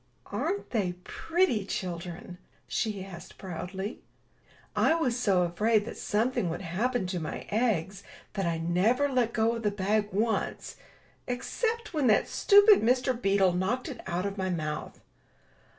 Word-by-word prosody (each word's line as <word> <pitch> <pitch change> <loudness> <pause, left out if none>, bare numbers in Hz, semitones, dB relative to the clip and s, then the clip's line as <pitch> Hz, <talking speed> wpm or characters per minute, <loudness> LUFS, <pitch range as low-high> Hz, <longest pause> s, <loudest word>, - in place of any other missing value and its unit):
Aren't 405 +1 -3
they 195 -7 0
pretty 325 - 0
children?" 175 -1 -5 0.3
she 210 -4 -2
asked, 175 -3 -11
proudly. 190 +4 -5 0.8
*'l 325 +1 +3
was 250 -7 +1
so 200 -7 +2
afraid 210 +5 +2
that - - -6
something 215 -3 0
would 165 +4 -4
happen 205 +6 -1
to 180 -1 -2
my 155 - -4
eggs 200 -4 0 0.3
that 195 -3 -1
I 165 -1 0
never 185 +12 +2
let 250 -4 +1
go 225 0 +2
of 230 - -4
the 210 - +2
bag 205 +1 0
once, 220 +3 -1 0.5
except 450 - -2
when 295 -5 +2
that 215 - +4
stupid 410 0 +6
Mr. 250 +3 +2
Beetle 195 -5 +2
knocked 190 +8 -1
it 250 -5 -7
out 180 +1 -1
of 200 0 -4
my 190 0 0
mouth." 155 -4 -4
205 Hz, 150 wpm, -29 LUFS, 180-245 Hz, 0.8 s, stupid